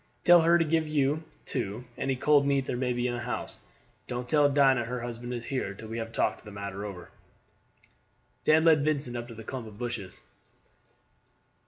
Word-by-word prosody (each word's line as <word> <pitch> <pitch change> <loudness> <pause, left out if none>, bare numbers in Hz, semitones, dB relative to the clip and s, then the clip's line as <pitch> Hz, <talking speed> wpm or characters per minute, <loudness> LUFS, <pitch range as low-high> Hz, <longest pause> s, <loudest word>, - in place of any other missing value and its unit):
Tell 175 -1 +8
her 170 +1 +5
to 165 - +2
give 160 0 +1
you, 150 +1 +1 0.2
too, 100 +5 -3
any 135 0 -1
cold 145 +2 +4
meat 140 -1 +2
there - - -2
may 125 0 0
be 120 0 -1
in 120 - -2
the 120 - -3
house. 120 +1 -4 0.5
Don't 125 0 -4
tell 145 +1 +4
Dinah 135 -4 +4
her 125 +1 -4
husband 120 0 -6
is 120 -1 -4
here 125 -7 -3
till 110 +2 -10
we 115 +1 -4
have 115 0 -5
talked - - 0
the 110 - -10
matter 100 -1 -6
over." 95 -4 -8 1.3
Dan 160 +1 +4
led 155 -3 +5
Vincent 145 -5 -1
up 120 0 -4
to 115 -2 -10
a - - -7
clump 120 0 -6
of 105 -2 -12
bushes. 115 -6 -5
125 Hz, 195 wpm, -28 LUFS, 115-145 Hz, 1.3 s, Tell